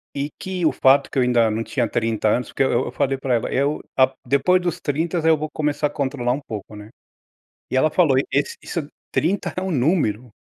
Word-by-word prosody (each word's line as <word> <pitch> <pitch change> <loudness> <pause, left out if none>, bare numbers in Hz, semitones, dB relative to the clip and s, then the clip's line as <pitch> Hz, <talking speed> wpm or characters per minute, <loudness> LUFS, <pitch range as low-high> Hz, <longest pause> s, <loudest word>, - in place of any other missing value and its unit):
e 140 +1 -3
que 185 -3 -3
o 155 - +4
fato 135 +1 +3
que - - -5
eu 130 - +4
ainda 120 -3 +3
não 110 +1 -2
tinha 115 +2 -1
30 110 -2 0
anos, 120 +3 0
porque - - 0
eu 130 - +1
eu - - +1
eu - - -5
falei 135 0 0
pra 135 -1 -1
ela, 115 - -2
"Eu 140 +3 0 0.2
a 130 0 +4
depois 140 +8 +3
dos 175 -1 -2
30, 160 +2 -1
eu 160 -1 +5
vou 155 +1 -4
começar 150 -1 -1
a - - -9
controlar 130 -4 -2
um 135 - -3
pouco, 110 -4 -8
né". 105 0 -11 0.8
E - - -3
ela 150 +4 +3
falou: 160 -7 +3 0.2
"Esse 140 +1 0
isso 155 -4 -4 0.2
30 185 +6 0
é - - -1
um 190 0 -2
número, 125 - +1
140 Hz, 230 wpm, -22 LUFS, 125-155 Hz, 0.8 s, eu